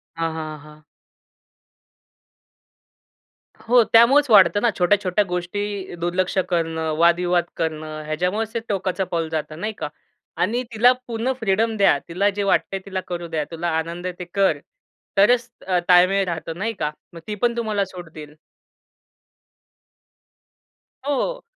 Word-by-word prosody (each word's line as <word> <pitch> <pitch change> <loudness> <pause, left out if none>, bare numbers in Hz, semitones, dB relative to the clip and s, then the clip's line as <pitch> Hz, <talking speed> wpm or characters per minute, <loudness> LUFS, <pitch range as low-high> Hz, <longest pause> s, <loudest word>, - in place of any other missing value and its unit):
हां, 165 -1 -2
हां, 155 -1 -6
हां. 150 +1 -16 2.8
हो, 240 0 +5
त्यामुळेच 265 +4 +6
वाढतं 205 -1 +6
ना, 235 - +3
छोट्या-छोट्या 190 +2 +2
गोष्टी 190 +2 -4
दुर्लक्ष 180 +2 -1
करणं, 165 -2 -1
वादविवाद 175 +1 +3
करणं, 155 -1 -3
याच्यामुळेच 180 +8 -1
ते 230 - -1
टोकाचं 190 -1 -1
पाऊल 165 -2 -1
जातं, 155 0 -4
नाही 215 +1 -3
का? - - -3 0.5
आणि 235 +8 0
तिला 240 +3 +6 0.2
पूर्ण 235 +2 -1
फ्रीडम 220 +1 +1
द्या. 195 -7 +4
तिला 190 +4 +1
जे 200 0 -2
वाटतंय 195 0 +1
तिला 190 -1 -3
करू 175 -1 -4
द्या. 160 -2 -2
तुला 165 +1 -3
आनंद 170 +2 -4
आहे 180 - -2
ते 180 - -5
कर, 195 -1 +3 0.6
तरच 240 +4 +4 0.2
अ, 180 -1 +2
ताळमेळ 185 +2 +5
राहतं 165 -1 -5
नाही 225 +4 -2
का? 150 0 -1 0.2
मग 165 - -9
ती 210 - -3
पण 240 -1 +2
तुम्हाला 215 -4 0
सोडतील. 160 -5 -11 2.7
हो. 290 - -1
185 Hz, 135 wpm, -22 LUFS, 165-210 Hz, 2.8 s, त्यामुळेच